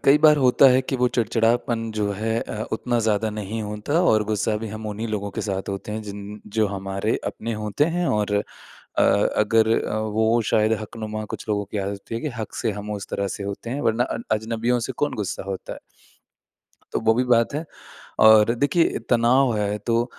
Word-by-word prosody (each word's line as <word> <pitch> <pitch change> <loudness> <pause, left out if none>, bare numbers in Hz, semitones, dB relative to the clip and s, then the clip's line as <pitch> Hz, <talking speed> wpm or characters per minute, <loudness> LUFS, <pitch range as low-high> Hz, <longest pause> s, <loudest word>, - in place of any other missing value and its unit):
कई 140 +2 +6
बार 150 0 +6
होता 130 0 +5
है 130 +1 +4
कि 135 - -2
वो 125 0 +2
चिड़चिड़ापन 115 0 +1
जो 105 -1 0
है 110 +3 -1
अ, 110 - -5
उतना 120 +2 0
ज़्यादा 110 +1 +1
नहीं 105 +1 -4
होता 105 +10 -1
और 110 -11 +4
गुस्सा 105 0 0
भी 110 0 -5
हम 110 +1 -6
उन्हीं 105 +2 -4
लोगों 100 -1 -3
के - - -4
साथ 95 -2 -3
होते 100 +2 -5
हैं 110 +1 -4
जिन 105 0 -8 0.2
जो 110 - +4
हमारे 95 +2 -2
अपने 115 +1 -4
होते 105 +8 +1
हैं। 175 -1 +1
और 105 -1 0
अ, 100 - -4
अगर 110 +1 +3 0.5
वो 110 +2 +3
शायद 110 +1 +3
हकनुमा 110 0 -5
कुछ - - -8
लोगों 100 -1 0
की 100 +1 -5
आदत 100 +3 -5
है 115 - -2
कि 150 - -2
हक 110 - -5
से 115 - -1
हम 105 +1 -7
उस 100 -2 -5
तरह 100 0 -1
से - - -6
होते 100 +4 -5
हैं। 135 +4 -2
वरना 115 +2 +2
अ 120 - -4 0.2
अजनबियों 115 +3 0
से - - -2
कौन 145 +4 -1
गुस्सा 100 -4 -3
होता 95 -1 -6
है? - - -8 1.1
तो - - 0
वो 110 - +3
भी 125 +2 +1
बात 120 +1 +2
है। 155 +3 -2 0.6
और 110 +1 +7
देखिए 145 +7 +2
तनाव 120 +1 +4
है 105 0 0
तो 115 0 +2
110 Hz, 200 wpm, -23 LUFS, 105-120 Hz, 1.1 s, और